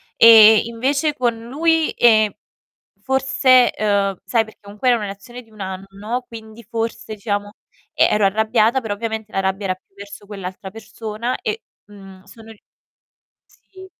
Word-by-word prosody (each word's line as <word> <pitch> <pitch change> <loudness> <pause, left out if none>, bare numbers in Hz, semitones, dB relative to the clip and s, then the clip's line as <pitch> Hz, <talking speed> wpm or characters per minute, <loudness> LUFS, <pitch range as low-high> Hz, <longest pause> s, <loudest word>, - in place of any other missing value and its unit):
E 220 -1 +8
invece 275 +6 -1
con 240 -2 -1
lui, 325 +3 +1
ehm, 220 -3 +4 0.7
forse, 265 -1 +3
uhm, 200 -2 0
sai 230 -2 +1
perché 220 - -17
comunque 205 +5 -2
era 240 - +4
una 210 - -5
relazione 200 +5 -9
di 225 - -26
1 210 -2 -12
anno, 195 +6 -6
quindi 220 0 -12
forse 225 -1 -5
diciamo 205 0 -4 0.4
e - - +4
ero 210 -1 +2
arrabbiata, 220 +4 +2
però 205 -3 -4
ovviamente 220 0 -5
la 195 - -2
rabbia 195 +1 -2
era 185 - -1
più 195 +1 -37
verso 200 0 -11
quell'altra 190 -1 -8
persona 220 +2 -5
e, 445 0 -4 0.2
mhmm, 195 -2 -15
sono 225 +3 -15
ri 220 - -17 1.1
Sì, 375 0 -12
220 Hz, 155 wpm, -19 LUFS, 200-240 Hz, 1.1 s, E